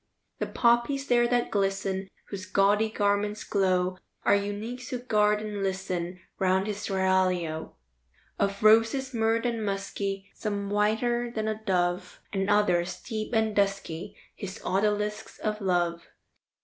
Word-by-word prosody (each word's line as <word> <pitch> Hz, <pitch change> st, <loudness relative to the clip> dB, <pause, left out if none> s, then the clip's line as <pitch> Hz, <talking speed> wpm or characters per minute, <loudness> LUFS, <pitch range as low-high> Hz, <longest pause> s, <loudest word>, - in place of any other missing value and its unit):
The -, -, -1 dB
poppies 240 Hz, +4 st, +2 dB
there 240 Hz, -2 st, +4 dB
that 240 Hz, 0 st, +1 dB
glisten, 195 Hz, -1 st, 0 dB, 0.2 s
Whose 190 Hz, -2 st, -6 dB
gaudy 205 Hz, +3 st, +3 dB
garments 205 Hz, 0 st, 0 dB
glow, 185 Hz, -2 st, +1 dB, 0.2 s
Are -, -, +4 dB
eunuchs 210 Hz, +6 st, -3 dB
who 255 Hz, -, -2 dB
guard 210 Hz, -3 st, +2 dB
and 210 Hz, -2 st, -4 dB
listen 185 Hz, -2 st, -2 dB, 0.2 s
Round 190 Hz, 0 st, +2 dB
his 210 Hz, -1 st, -3 dB
seraglio 185 Hz, -4 st, 0 dB, 0.6 s
Of 200 Hz, +1 st, 0 dB
roses, 225 Hz, +5 st, +5 dB
myrrhed 225 Hz, +1 st, +1 dB
and 230 Hz, -2 st, -1 dB
musky; 195 Hz, 0 st, -3 dB
Some 200 Hz, -2 st, -3 dB
whiter 225 Hz, +4 st, +1 dB
than 220 Hz, -2 st, -3 dB
a 220 Hz, 0 st, -3 dB
dove, 180 Hz, -2 st, 0 dB
And 195 Hz, 0 st, 0 dB
others, 185 Hz, -4 st, +2 dB
deep 215 Hz, -2 st, -4 dB
and 220 Hz, -1 st, +2 dB
dusky, 195 Hz, -2 st, -1 dB, 0.2 s
His 195 Hz, -1 st, -7 dB
odalisks 210 Hz, +2 st, 0 dB
of 215 Hz, 0 st, -2 dB
love. 175 Hz, -3 st, +1 dB
205 Hz, 135 wpm, -28 LUFS, 190-220 Hz, 0.6 s, roses